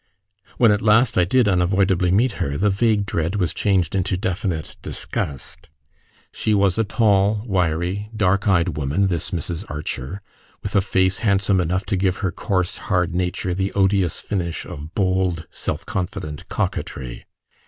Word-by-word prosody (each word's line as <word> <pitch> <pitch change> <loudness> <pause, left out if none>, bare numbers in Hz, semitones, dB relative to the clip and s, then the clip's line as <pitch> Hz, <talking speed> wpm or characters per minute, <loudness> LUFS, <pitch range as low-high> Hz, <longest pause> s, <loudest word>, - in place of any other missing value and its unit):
When 115 -3 +5
at 105 - +1
last 110 +3 +4
I 90 - +4
did 125 +4 +3
unavoidably 95 -1 +2
meet 115 +8 +3
her, 70 +1 -1
the 105 +4 +2
vague 105 0 +2
dread 85 -1 -1
was 90 -5 0
changed 95 -6 +1
into 95 -1 0
definite 90 -3 -3
disgust. 75 +4 -5 0.6
She 110 - 0
was 100 0 +2
a - - +4
tall, 105 -1 +2
wiry, 90 +1 -1
dark 100 -1 +2
eyed 90 -5 +2
woman, 75 +8 +1
this 85 -2 -2
Mrs. 85 0 -3
Archer, 75 +4 -5 0.4
with - - -4
a 100 - +5
face 95 -1 +1
handsome 100 -3 +2
enough 90 +3 -1
to 105 - -1
give 95 -1 +1
her 95 - 0
coarse 90 +1 -1
hard 90 -3 +1
nature 90 0 -1
the 95 +2 -1
odious 95 -4 +2
finish 85 -5 -3
of 75 +3 -9
bold, 95 -4 0
self - - -4
confident 90 -5 -4
coquetry. 60 -2 -3
95 Hz, 155 wpm, -22 LUFS, 85-100 Hz, 0.6 s, When